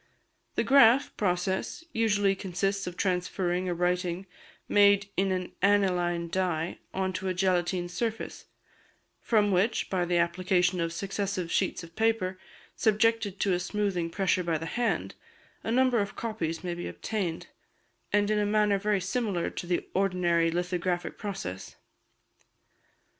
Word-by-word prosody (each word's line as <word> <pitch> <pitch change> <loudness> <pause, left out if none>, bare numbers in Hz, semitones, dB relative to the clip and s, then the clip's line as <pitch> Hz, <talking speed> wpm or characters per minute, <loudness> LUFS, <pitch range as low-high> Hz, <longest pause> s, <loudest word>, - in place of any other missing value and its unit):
The - - +2
"graph" 270 -1 +5
process 190 - -1
usually 205 -3 +2
consists 195 +1 -2
of 180 0 -6
transferring 180 -1 0
a 175 - -1
writing 180 +1 -1 0.4
made 200 -1 +4
in 195 +1 +1
an 185 -1 -2
aniline 180 -4 +2
dye 175 -2 -1
on 190 0 -1
to 190 +1 -3
a 185 - -1
gelatine 180 -1 +1
surface, 225 +5 -4 0.7
from 210 -3 +2
which, 195 +5 +1
by 180 -2 +1
the 175 0 +1
application 175 +1 +1
of 165 0 -1
successive 195 -2 -3
sheets 185 -2 0
of 165 0 -13
paper, 220 -5 0 0.4
subjected 220 -2 +2
to 195 - +2
a 175 - +1
smoothing 180 -2 -1
pressure 185 0 +1
by 165 -2 0
the 165 - -6
hand, 240 +6 -1 0.5
a - - -3
number 250 0 +3
of 200 -1 -2
copies 185 -8 -3
may 175 -1 -2
be 175 0 -5
obtained, 185 -7 -3 0.7
in 205 0 +3
a 210 -1 +2
manner 210 -1 +2
very 205 -1 +1
similar 190 -2 -1
to 175 - -6
the 175 -1 -1
ordinary 180 -3 +2
lithographic 175 +1 -2
process. 195 - -5
185 Hz, 140 wpm, -28 LUFS, 175-205 Hz, 0.7 s, graph